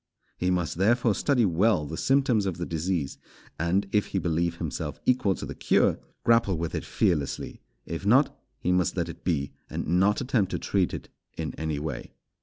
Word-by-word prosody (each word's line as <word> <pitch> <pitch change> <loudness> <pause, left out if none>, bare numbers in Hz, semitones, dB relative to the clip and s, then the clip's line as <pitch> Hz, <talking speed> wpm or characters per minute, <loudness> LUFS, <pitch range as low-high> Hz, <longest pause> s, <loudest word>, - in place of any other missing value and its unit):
He 90 - -1
must 90 -2 -1
therefore 115 +3 +3
study 125 +1 +2
well 90 -1 +2
the 80 - -5
symptoms 125 -3 +2
of 90 -3 -2
the 85 - -3
disease; 80 -3 -2 0.4
and, 90 +5 +1
if 105 -1 +2
he - - -3
believe 85 -1 0
himself 75 -7 -4
equal 105 -7 +3
to - - -6
the - - -6
cure, - - +2 0.2
grapple 115 -6 +3
with 85 0 -3
it - - -2
fearlessly; 75 -6 -1 0.2
if 85 +2 -5
not, 125 +8 +4 0.2
he 90 - -1
must 90 0 +1
let 85 -1 0
it 85 - -9
be, 70 -6 0 0.2
and - - -3
not 95 +6 +3
attempt 120 -7 +1
to - - +1
treat 95 -3 0
it - - -8 0.3
in 80 -1 -3
any 80 -2 -3
way. 75 +2 -5
90 Hz, 190 wpm, -27 LUFS, 80-105 Hz, 0.4 s, not